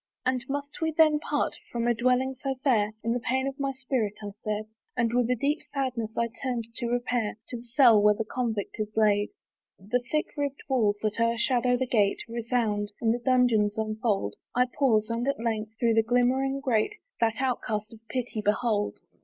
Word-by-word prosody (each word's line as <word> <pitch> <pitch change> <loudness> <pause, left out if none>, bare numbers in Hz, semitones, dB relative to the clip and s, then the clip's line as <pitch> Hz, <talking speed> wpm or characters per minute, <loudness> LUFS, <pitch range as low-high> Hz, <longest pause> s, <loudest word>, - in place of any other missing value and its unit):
"And 255 -1 +1
must 285 +2 -4
we 320 - +2
then 310 -1 +4
part - - -1 0.2
from 235 -1 -1
a 240 - +3
dwelling 255 +3 +2
so 270 +1 -3
fair?" 220 -6 +2
In 230 - +1
the 245 - 0
pain 260 +3 0
of 275 +1 -5
my 275 -1 0
spirit 255 -5 -2
I 205 - -5
said, 215 0 -2 0.3
And 235 -1 +1
with 245 -1 +2
a 250 - +3
deep 290 +6 0
sadness 250 -6 -3
I 235 - +2
turned, 250 -3 -1
to 240 - -1
repair 240 -3 -1
To 245 - -4
the - - -9
cell 240 -2 +5
where 210 0 +5
the 220 - -2
convict 225 -4 -3
is 215 0 -4
laid. 205 -1 +3 0.5
The 210 +6 -1
thick 305 0 0
ribbed 285 -2 -3
walls 220 -7 +2
that 215 0 -1
o'ershadow 235 +2 +2
the 260 - 0
gate 210 -5 +2
Resound; 230 -3 -1
and 225 -1 +2
the 240 - -2
dungeons 240 -5 +3
unfold: 215 - -1 0.2
I 250 +1 +4
pause; 220 -6 +3
and 235 +3 -1
at 280 - 0
length, 220 -1 -2
through 230 -1 +2
the 225 - +5
glimmering 255 +4 +1
grate, 255 - +1 0.2
That 225 -1 +2
outcast 225 -5 -2
of 225 - -13
pity 240 -3 -3
behold. 210 0 +1
235 Hz, 195 wpm, -27 LUFS, 215-260 Hz, 0.5 s, cell